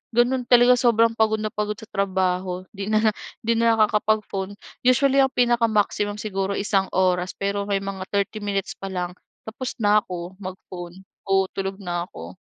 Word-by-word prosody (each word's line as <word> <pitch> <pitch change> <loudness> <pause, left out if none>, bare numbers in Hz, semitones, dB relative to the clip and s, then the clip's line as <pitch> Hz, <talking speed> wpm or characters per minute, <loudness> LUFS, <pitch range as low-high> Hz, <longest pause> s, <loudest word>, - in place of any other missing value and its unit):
Gano'n 245 +1 +2
talaga, 245 0 +6
sobrang 230 -2 +4
pagod 220 -1 +1
na 215 - -2
pagod 210 0 -2
sa 220 - -13
trabaho, 185 -3 -1
'di 200 -2 -6
na 215 0 +3 0.3
'di 230 0 +1
na 230 0 +4
nakakapag-phone. 210 -2 +1 0.3
Usually, 275 +2 +4
ang 265 -1 +3
pinaka-maximum 225 -4 +2
siguro, 195 -2 -2
isang 195 -1 +1
oras 180 -1 +1
pero 200 0 -2
may 195 -1 0
mga 190 -1 -5
30 200 +2 -1
minutes 200 -2 -2
pa 195 - -7
lang, 180 -2 -3 0.3
tapos 250 +4 -6
na 210 +1 +5
ako, 180 -2 -7
mag-phone. 185 -1 -8 0.2
Oo, 195 0 +4
tulog 195 0 -3
na 175 -1 -3
ako. 85 - -10
205 Hz, 165 wpm, -23 LUFS, 190-220 Hz, 0.3 s, talaga